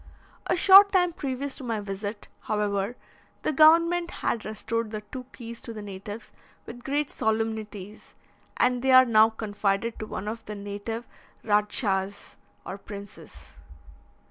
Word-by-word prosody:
A - - +2
short 395 +3 +8
time 360 -3 +3
previous 275 -2 -4
to - - -8
my 230 -3 -2
visit, 205 +1 -6
however, 210 +1 -1 0.5
the - - +1
government 335 +3 +5
had 230 - -2
restored 220 +1 -3
the 215 -1 -5
two 250 +4 -8
keys 235 -3 -9
to 230 - -7
the 215 - -7
natives 205 +2 -8 0.3
with 240 +1 -10
great 285 +1 -1
solemnities, 220 -2 -3 0.4
and 250 -1 +2
they 265 0 +3
are 255 0 +9
now 220 -2 +5
confided 215 0 -2
to 215 - -5
one 205 - -5
of 225 +1 -5
the 210 - -6
native 205 +3 -5 0.4
Radschas, 205 -2 0 0.3
or 195 - -6
princes. 200 0 -11
220 Hz, 145 wpm, -26 LUFS, 205-255 Hz, 0.5 s, are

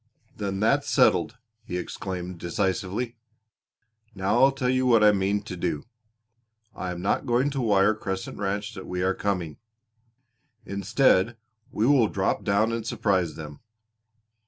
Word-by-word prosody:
"Then 100 -2 -3
that's 110 - +2
settled," - - +3 0.3
he 90 - -4
exclaimed 90 -1 -5
decisively. 95 +6 -2 1.0
"Now 100 +6 +2
I'll 135 - +6
tell 135 -2 -2
you 130 0 +2
what 115 -3 +5
I 105 - +7
mean 100 +1 0
to 95 -3 -7
do. 75 -4 -3 0.9
I 95 - -4
am 90 0 -5
not 105 +7 0
going 125 +4 +2
to 135 -1 -2
wire 105 -2 +3
Crescent 95 -3 -5
Ranch 100 +2 -2
that 95 -3 -9
we 90 0 -2
are 95 +1 +2
coming. 90 -6 -2 1.1
Instead 100 +2 +2 0.3
we 110 - 0
will 130 -4 +5
drop 95 -1 -1
down 110 +2 +2
and 115 0 -2
surprise 95 -8 0
them. 75 -2 -9
100 Hz, 145 wpm, -26 LUFS, 95-115 Hz, 1.1 s, I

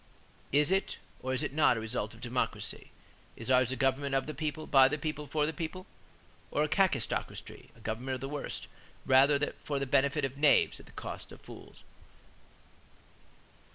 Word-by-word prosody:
Is 145 +4 +3
it 195 +1 0 0.2
or 130 - -3
is 130 +3 0
it 145 - -3
not 145 -5 +4
a - - -1
result 110 -1 -3
of 115 - -16
democracy? 125 0 0 0.5
Is 115 +3 -3
ours 130 -1 +4
a - - -1
'government 135 +1 +1
of 135 - +1
the 155 - -5
people, 155 +1 -3
by 135 -3 +6
the 150 +3 -1
people, 150 -1 -4
for 150 +2 +1
the 160 - -2
people,' 170 +3 -5 0.6
or 150 - +1
a - - +1
Kakistocracy 185 +5 -1
[a - - -19
government 120 +5 -3
of 130 - -8
the 135 - -3
worst], 145 0 -4 0.4
rather 140 +2 +4
for 145 - -2
the 140 - -1
benefit 140 +2 +2
of 135 +1 -6
knaves 145 -1 +4
at - - -15
the - - -15
cost - - -7
of - - -12
fools?" - - -13
140 Hz, 185 wpm, -31 LUFS, 130-150 Hz, 0.6 s, by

